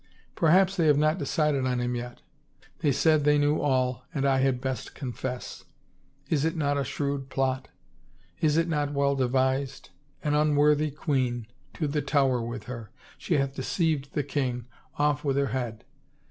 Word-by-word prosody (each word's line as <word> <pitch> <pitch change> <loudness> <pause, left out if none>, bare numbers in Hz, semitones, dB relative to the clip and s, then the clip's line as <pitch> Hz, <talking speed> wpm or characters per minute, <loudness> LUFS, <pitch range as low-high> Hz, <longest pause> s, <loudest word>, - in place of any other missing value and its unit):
Perhaps 185 +4 +4
they 165 -3 +3
have 145 -2 +5
not 155 +4 +2
decided 150 -7 +1
on 125 -1 0
him 120 0 -1
yet. 120 0 -6 0.6
They 145 - +2
said 155 +2 +3
they 150 0 +4
knew 145 +1 +2
all 130 -2 +1
and 140 -1 0
I 135 -1 +3
had 130 -1 +2
best 130 -1 -4
confess.... 125 -2 -5 0.6
Is 150 -3 +1
it 160 +1 0
not 145 -3 +1
a 140 - 0
shrewd 140 0 -3
plot? 130 0 -1 0.7
Is 155 -1 +2
it 165 +1 +2
not 145 -3 -1
well 140 0 +2
devised? 130 +1 0 0.3
An 150 - +1
unworthy 150 0 +3
queen 130 -5 -1
— - - -35
to 155 - -1
the 145 +1 -1
Tower 135 -3 +2
with 120 0 -5
her! 115 -2 -7 0.3
She - - 0
hath 135 -1 0
deceived 145 0 -1
the 145 - 0
king 130 -4 -2 0.2
— - - -32
off 145 0 +1
with 140 -2 0
her 140 -2 +1
head! 120 -4 -3
140 Hz, 175 wpm, -27 LUFS, 130-150 Hz, 0.7 s, have